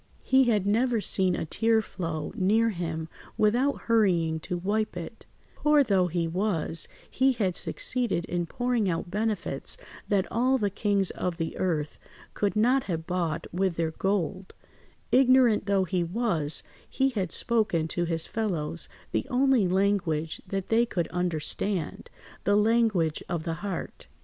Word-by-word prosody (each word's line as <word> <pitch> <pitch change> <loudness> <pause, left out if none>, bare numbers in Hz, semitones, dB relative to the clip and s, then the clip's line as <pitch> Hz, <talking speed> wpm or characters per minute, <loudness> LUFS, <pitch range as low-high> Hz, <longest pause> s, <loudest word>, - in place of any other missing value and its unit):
He 265 0 +4
had 210 -5 +2
never 230 +3 +2
seen 190 -3 +1
a - - -3
tear 225 +7 +2
flow 165 -7 -4
near 220 +5 +2
him 165 -3 -4 0.3
without 245 +7 +2
hurrying 175 -8 +2
to 175 +3 -4
wipe 205 +2 -1
it; 180 +7 -8 0.3
poor 300 -1 +4
though 195 -7 +2
he 170 -1 -1
was, 170 -2 0 0.2
he 265 +1 +2
had 195 -7 -1
succeeded 240 -9 -1
in 175 -1 -2
pouring 245 -1 0
out 170 +1 -3
benefits 215 - -2 0.3
that 195 -2 +2
all 255 +3 +2
the 205 -5 -1
kings 200 -1 +1
of 175 -2 -3
the 165 -2 -3
earth 155 -5 -2 0.3
could 205 0 -1
not 245 +5 +3
have 165 -3 -3
bought 175 -4 -2
with 185 -1 0
their 165 -1 -1
gold; 190 +1 -2 0.6
ignorant 255 -5 +4
though 200 -1 +3
he 185 -1 -1
was, 170 -5 0 0.3
he 270 0 +1
had 195 -9 -2
spoken 210 -9 +1
to 175 +1 0
his 165 -1 0
fellows 170 -7 -1 0.2
the - - -1
only 255 -5 +3
language 180 -5 0
that 195 0 -4
they 225 +1 +4
could 180 -8 -2
understand, 180 +1 -2 0.3
the 205 +2 +3
language 210 -7 +2
of 170 -2 -2
the 165 -1 -2
heart. 200 -4 -5
195 Hz, 150 wpm, -27 LUFS, 170-225 Hz, 0.6 s, He